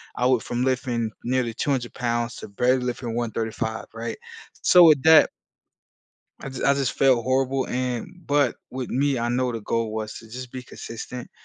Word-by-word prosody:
I 125 - 0
went 125 -3 +3
from 120 +1 -2
lifting 125 -4 0
nearly 125 -1 0
200 125 0 -1
pounds 120 -1 -1
to - - -8
barely 125 +5 +2
lifting 125 -1 -3
135, 110 -1 -3
right? 115 0 -5 0.5
So, 180 -1 +8
with 150 -4 +6
that 160 0 +7 1.1
I 135 - -6
j 130 - -7
I 140 - +5
just 135 -3 0
felt 130 -4 +3
horrible 130 +1 +1
and 130 +8 -3
but 145 0 +2
with 130 -1 -5
me, 140 0 +1
I 120 +1 -1
know 125 0 0
the 115 - -4
goal 115 0 -1
was 110 -1 -4
to 115 - -10
just 125 +1 -8
be 130 - -6
consistent 120 +1 -8
125 Hz, 180 wpm, -24 LUFS, 115-130 Hz, 1.1 s, So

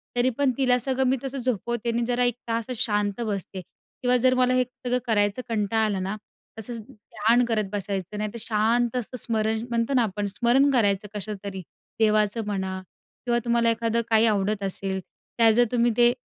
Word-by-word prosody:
तरी 245 +1 +3
पण 280 -2 +2
तिला 255 -2 +3
सगळं 265 +1 0
मी 265 - +2
तसं 270 0 -4
झोपवते 240 -1 -2
आणि 235 +1 -1
जरा 245 0 +1
1 245 -2 +2
तास 230 -1 -1
शांत 205 0 0
बसते 195 -2 -4
किंवा 245 +7 -3
जर 255 +1 +3
मला 255 0 +3
हे 255 0 +3
सगळं 250 0 -3
करायचं 205 +1 +2
कंटाळ 220 0 +1
आला 200 -3 -1
ना 195 +2 -3 0.4
तसंच 230 +1 -5
ध्यान 220 +3 +1
करत 215 -4 -1
बसायचं, 200 -1 -3
नाही 210 0 -2
तर 235 - -6
शांत 230 +2 +1
असं 250 +1 -4
स्मरण 220 -1 0
म्हणतो 235 +3 0
ना 250 -3 +4
आपण 205 -1 -2
स्मरण 240 +7 +3
करायचं 205 -5 +2
कशाचं 210 0 -4
तरी. 190 -2 -5 0.4
देवाचं 215 0 +2
म्हणा 190 -2 -3 0.4
किंवा 240 -1 +2
तुम्हाला 235 -1 +3
एखादं 230 0 0
काही 220 0 +5
आवडत 205 -1 +1
असेल, 195 0 -2 0.4
त्या 230 -1 +6
जर 240 +2 +4
तुम्ही 240 -1 +2
ते 240 0 +6
225 Hz, 185 wpm, -25 LUFS, 205-245 Hz, 0.4 s, त्या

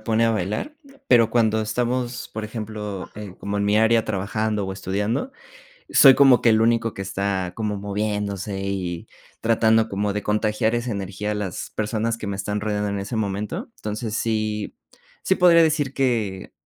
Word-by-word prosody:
pone 110 +1 +1
a 115 - +3
bailar, 105 - -2 0.3
pero 115 -2 +5
cuando 110 -2 +2
estamos, 120 +3 -2
por 110 0 -4
ejemplo, 105 -3 -6
en, 105 -3 -8
como 100 +1 -4
en 100 - 0
mi 105 +1 +3
área 110 +1 +3
trabajando 105 +1 -1
o 95 - -4
estudiando, 105 - -2 0.6
soy 135 -2 +8
como 135 -3 +6
que - - +3
el 110 0 +4
único 115 -1 +2
que 95 - -5
está 95 -1 -2
como 105 -1 -2
moviéndose, 100 -1 -3
y 95 -3 -3 0.4
tratando 110 0 +3
como 100 +1 -1
de 105 - -2
contagiar 105 +1 0
esa 120 0 -2
energía 100 +1 -3
a - - -2
las 100 -4 -4
personas 110 +1 -1
que 110 - -7
me 100 -1 -3
están 105 +2 -2
rodeando 105 -1 -1
en 100 0 -2
ese 100 +4 -4
momento. 105 - -3
Entonces, 110 +1 -4
sí 110 -2 -2 0.5
sí 190 - +2
podría 175 -2 +6
decir 150 -4 +1
que 115 -9 -1
105 Hz, 175 wpm, -23 LUFS, 100-115 Hz, 0.6 s, soy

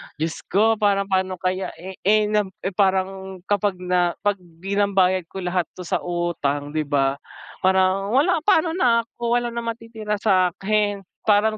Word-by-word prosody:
diyos 160 +2 -3
ko, 220 +3 +3
parang 200 -2 +2
pa'no 185 0 +1
kaya, 185 +1 -3
eh, 185 +2 -10
eh, 210 +1 +3
na, 210 -2 +2 0.2
eh, 190 - -1
parang 190 -1 -1
kapag 205 0 0
na 180 -1 0
'pag 205 -1 +1
pinambayad 185 +1 0
ko 190 +1 -7
lahat 180 -1 0
'to 180 - -7
sa 175 - -1
utang 165 -5 -2
'di 155 -1 -2
ba, 140 -1 +1 0.4
parang 190 +1 +2
wala, 320 +6 +3
pa'no 330 -1 +3
na 240 -9 +3
ako, 235 +1 -2
wala 240 0 0
nang 235 0 -4
matitira 225 -2 -4
sa'kin. 200 +1 +1 0.2
Parang 215 +1 +3
195 Hz, 160 wpm, -22 LUFS, 180-215 Hz, 0.4 s, ko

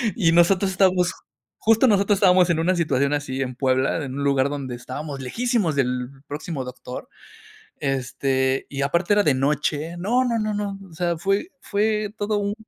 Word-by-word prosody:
Y 170 -7 +3
nosotros 185 +3 +4
estábamos 185 -1 +2 0.5
justo, 225 +3 +4
nosotros 200 -1 +3
estábamos, 185 -2 +5
en 165 -1 +2
una 180 +3 +2
situación 140 -4 +1
así, 135 -2 -2
en 125 -2 -3
Puebla, 130 +3 +1
en 130 - -6
un 140 - -3
lugar, 140 -1 +2
donde 135 -4 -4
estábamos 135 +4 -6
lejísimos 220 - 0
del 125 -2 0 0.2
próximo 145 -1 -5
doctor, 125 0 -8 0.7
este, 130 0 -1
y 140 -1 -4
aparte, 170 +7 +1
era 205 0 +4
de 145 - +3
noche, 150 +4 -1
no, 235 +8 +1
no, 235 -2 0
no, 215 -1 -1
no. 205 -1 -3
O - - -14
sea, 170 0 -1
fue 195 - -1
fue 210 0 0
todo 210 0 -1
un 205 0 -1
165 Hz, 175 wpm, -23 LUFS, 135-200 Hz, 0.7 s, estábamos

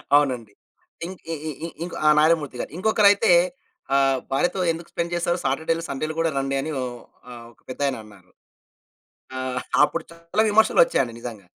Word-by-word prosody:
అవునండి. 125 -7 +1 0.5
ఇంక్ 185 +1 -8
ఇ - - -2
ఇ - - -3
ఇ - - -3 0.2
ఇంక్ 175 - -6
ఆహ్, 150 0 +6
'నారాయణమూర్తి' 150 -4 +2
గారు. - - -6
ఇంకొకరైతే 205 -1 +4 0.6
ఆహ్, 135 -1 +3
భార్యతో 175 +8 +1
ఎందుకు 165 +1 -7
స్పెండ్ 170 0 -3
జేసారు. 175 0 0
సాటర్‌డే‌లు, 160 +4 0
సండేలు 155 +3 -3
కూడా 165 0 +2
రండి 135 0 -1
అని 155 +3 -4
ఓహ్! 125 -1 -4 0.4
ఆహ్, 120 -1 -10
ఒక - - -32
పెద్దాయన 135 +1 -1
అన్నారు. 100 -4 -18 1.1
ఆహ్, 130 -1 -3 0.2
అప్పుడు 165 - -3
చాలా 170 +5 -1
విమర్శలొచ్చాయండి 220 - +3
నిజంగా. 110 -6 -8
150 Hz, 155 wpm, -23 LUFS, 130-170 Hz, 1.1 s, ఆహ్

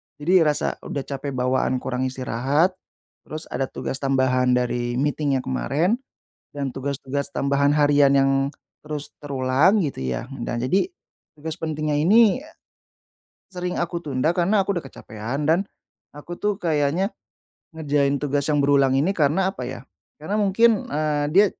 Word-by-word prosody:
jadi 165 +2 +3
rasa 150 - -1
udah 140 - -5
capek 140 -1 -5
bawaan 130 +1 +1
kurang 130 0 -1
istirahat, 130 +7 0 0.6
terus 155 +1 -4
ada 135 +1 -1
tugas 135 - -5
tambahan 130 -2 +2
dari 120 -1 -1
meeting 145 +1 0
yang 130 - -1
kemarin, 155 - 0 0.5
dan 140 -2 -3
tugas-tugas 140 +1 -4
tambahan 140 +1 +2
harian 145 -2 +4
yang 135 0 +4 0.5
terus 150 -1 -4
terulang, 140 +8 +2
gitu, 135 - -3
ya. 65 - -3
Nah, 120 0 -3
jadi 140 - +2 0.5
tugas 160 +2 -6
pentingnya 155 -2 -2
ini 225 - +4 1.0
sering 180 -1 -4
aku 170 0 -2
tunda, 150 +5 0
karena 195 +4 +3
aku 195 -1 -1
udah 160 - -5
kecapean, 125 +5 -5
dan 180 +5 +3 0.5
aku 170 +4 -8
tuh 210 -1 -1
kayaknya 160 +4 +1 0.7
ngerjain 145 -3 0
tugas 145 -1 0
yang 145 -2 +2
berulang 140 -2 +3
ini 150 +8 +2
karena, 180 +2 +2
apa 125 -9 -6
ya, 125 -1 -7 0.4
karena 200 +7 -1
mungkin, 210 +2 +3
eee, 150 0 0
dia 205 +2 +7
145 Hz, 145 wpm, -23 LUFS, 135-170 Hz, 1.0 s, dia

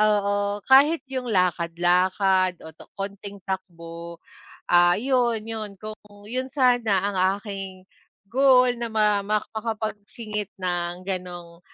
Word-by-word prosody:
Oo, 205 -1 +1
kahit 285 +5 +5
yung 255 -2 -3
lakad-lakad 180 +1 +2
o 160 - -9
to - - -16
konting 200 0 -6
takbo, 170 -3 -6 0.5
ah, 175 0 +6
iyon 245 -3 +1
iyon 220 -2 -5
kung 215 0 -7 0.3
iyon 255 +3 -3
sana 245 -8 +2
ang 200 -2 -3 0.2
aking, 195 -2 -8 0.4
goal 255 +1 +5
na 235 - -2
ma 210 -2 +2
ma 210 +1 +1 0.2
makapagsingit 215 -1 -4
ng 175 0 -2
ganong 175 -2 -6
200 Hz, 120 wpm, -24 LUFS, 180-225 Hz, 0.5 s, ah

